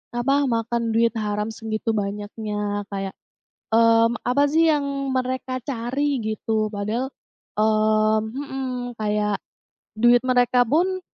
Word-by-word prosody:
apa, 265 Hz, +3 st, +2 dB
makan 230 Hz, 0 st, -1 dB
duit 230 Hz, +1 st, +2 dB
haram 210 Hz, 0 st, -2 dB
segitu 220 Hz, 0 st, -2 dB
banyaknya 205 Hz, 0 st, -3 dB
kayak, 195 Hz, -1 st, -4 dB, 0.6 s
mmm, 230 Hz, 0 st, +5 dB
apa 280 Hz, +4 st, +2 dB
sih 325 Hz, +1 st, +4 dB
yang 290 Hz, -2 st, +1 dB, 0.3 s
mereka 255 Hz, 0 st, -2 dB
cari? 270 Hz, +1 st, -1 dB
Gitu. 215 Hz, 0 st, -1 dB
Padahal, 220 Hz, +6 st, -2 dB, 0.5 s
mmm 215 Hz, 0 st, +2 dB
mhm. 260 Hz, -3 st, -4 dB
Kayak 210 Hz, -1 st, 0 dB, 0.6 s
duit 240 Hz, +1 st, +6 dB
mereka 245 Hz, 0 st, +4 dB
pun, 370 Hz, +6 st, +1 dB
230 Hz, 115 wpm, -23 LUFS, 215-255 Hz, 0.6 s, duit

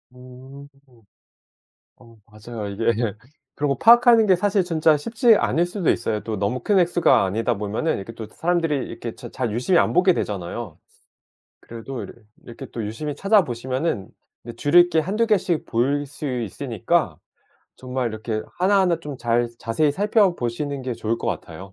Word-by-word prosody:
음. 130 Hz, +3 st, -13 dB, 1.3 s
어 115 Hz, -1 st, -18 dB
맞아요. 110 Hz, 0 st, -8 dB
이게 115 Hz, +4 st, 0 dB, 0.6 s
그리고 145 Hz, -1 st, 0 dB
파악하는 235 Hz, -1 st, +6 dB
게 185 Hz, -, +5 dB
사실 200 Hz, +1 st, +1 dB
진짜 160 Hz, -3 st, +2 dB
쉽지 230 Hz, -, +3 dB
않을 170 Hz, -2 st, +1 dB
수도 180 Hz, -1 st, -2 dB
있어요. 110 Hz, -2 st, 0 dB
또 110 Hz, -2 st, -4 dB
너무 105 Hz, +6 st, -1 dB
큰 205 Hz, -2 st, +1 dB
액수가 170 Hz, -, +3 dB
아니다 115 Hz, +5 st, -1 dB
보면은 105 Hz, +10 st, -1 dB
이렇게 105 Hz, +4 st, -8 dB
또 110 Hz, -2 st, -8 dB
사람들이 165 Hz, -1 st, -1 dB
이렇게 115 Hz, -2 st, -7 dB
잘 125 Hz, -4 st, -5 dB
유심히 130 Hz, -, +2 dB
안 -, -, +1 dB
보게 180 Hz, +1 st, +4 dB
되잖아요. 100 Hz, -, -5 dB, 0.8 s
그래도 120 Hz, +3 st, -8 dB
이렇 -, -, -10 dB, 0.3 s
이렇게 120 Hz, -, -9 dB
또 115 Hz, -3 st, -4 dB
유심히 140 Hz, +8 st, -5 dB
찾아보시면은 130 Hz, -, 0 dB, 0.5 s
줄일 175 Hz, +4 st, +5 dB
게 160 Hz, -, +2 dB
1-2 205 Hz, +8 st, 0 dB
개씩 190 Hz, -7 st, 0 dB
보일 140 Hz, +5 st, 0 dB
수 145 Hz, +1 st, -7 dB, 0.2 s
있으니까 100 Hz, -, -1 dB, 0.6 s
정말 130 Hz, -1 st, -3 dB
이렇게 110 Hz, 0 st, -4 dB, 0.2 s
하나하나 185 Hz, -3 st, +2 dB
좀 145 Hz, -4 st, -7 dB
잘 120 Hz, 0 st, 0 dB
자세히 145 Hz, +6 st, 0 dB
살펴보시는 150 Hz, -, 0 dB
게 125 Hz, -1 st, -3 dB
좋을 115 Hz, 0 st, -2 dB
것 -, -, -6 dB
같아요. -, -, -5 dB
135 Hz, 330 characters per minute, -22 LUFS, 115-175 Hz, 1.3 s, 파악하는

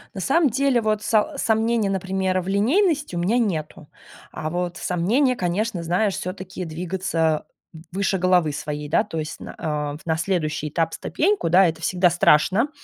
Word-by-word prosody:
На 190 Hz, -, -4 dB
самом 295 Hz, -, +3 dB
деле, 270 Hz, 0 st, +2 dB
вот 215 Hz, -1 st, 0 dB
са 230 Hz, +7 st, +1 dB
сомнений, 225 Hz, -3 st, +1 dB
например, 190 Hz, -1 st, -1 dB
в 180 Hz, -, -6 dB
линейности 285 Hz, -, +1 dB
у -, -, -1 dB
меня 200 Hz, +8 st, +1 dB
нету, 155 Hz, -9 st, -2 dB, 0.4 s
а 155 Hz, -, -4 dB
вот 175 Hz, +1 st, -3 dB
сомнения, 230 Hz, +10 st, +1 dB
конечно, 185 Hz, -1 st, -2 dB
знаешь, 185 Hz, +4 st, +1 dB
всё-таки 185 Hz, 0 st, -6 dB
двигаться 165 Hz, -1 st, -1 dB, 0.5 s
выше 195 Hz, +1 st, 0 dB
головы 180 Hz, -4 st, +2 dB
своей, 150 Hz, 0 st, -5 dB
да, 165 Hz, +8 st, +2 dB
то 185 Hz, -7 st, -5 dB
есть 155 Hz, +1 st, -6 dB
на, -, -, -8 dB
а, 150 Hz, -2 st, -3 dB
на 160 Hz, -1 st, +1 dB
следующий 155 Hz, -4 st, -1 dB
этап 165 Hz, +1 st, -1 dB
ступеньку, 385 Hz, -, 0 dB
да, 185 Hz, +2 st, +6 dB
это 160 Hz, 0 st, -4 dB
всегда 180 Hz, 0 st, +2 dB
страшно 185 Hz, -, +3 dB
185 Hz, 165 wpm, -23 LUFS, 165-220 Hz, 0.5 s, да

